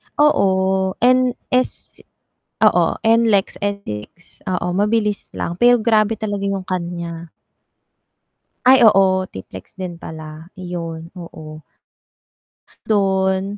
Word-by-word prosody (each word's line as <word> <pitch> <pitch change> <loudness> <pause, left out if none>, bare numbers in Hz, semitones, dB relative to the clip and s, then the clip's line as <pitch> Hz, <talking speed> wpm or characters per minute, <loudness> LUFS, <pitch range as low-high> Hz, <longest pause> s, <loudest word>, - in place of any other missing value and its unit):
Oo, 190 -9 +2
NS 255 0 +1 0.6
oo, - - +5 0.2
NLEX, 225 -3 +2
NLEX, 200 - -6
oo, 180 -1 -2
mabilis 210 +2 -1
lang, 170 +1 -4
pero 240 -1 +4
grabe 220 -1 +2
talaga 205 -2 -4
yung 195 -1 -2
kanya. 170 -2 -5 1.3
Ay, 260 +1 +7
oo 190 -2 +3
TPLEX 95 - -11
din 180 -3 -6
pala. 155 +1 -9
Yun, 170 -2 -6
oo. 155 -3 -10 1.2
Dun, 195 -1 0
190 Hz, 95 wpm, -19 LUFS, 170-215 Hz, 1.3 s, Ay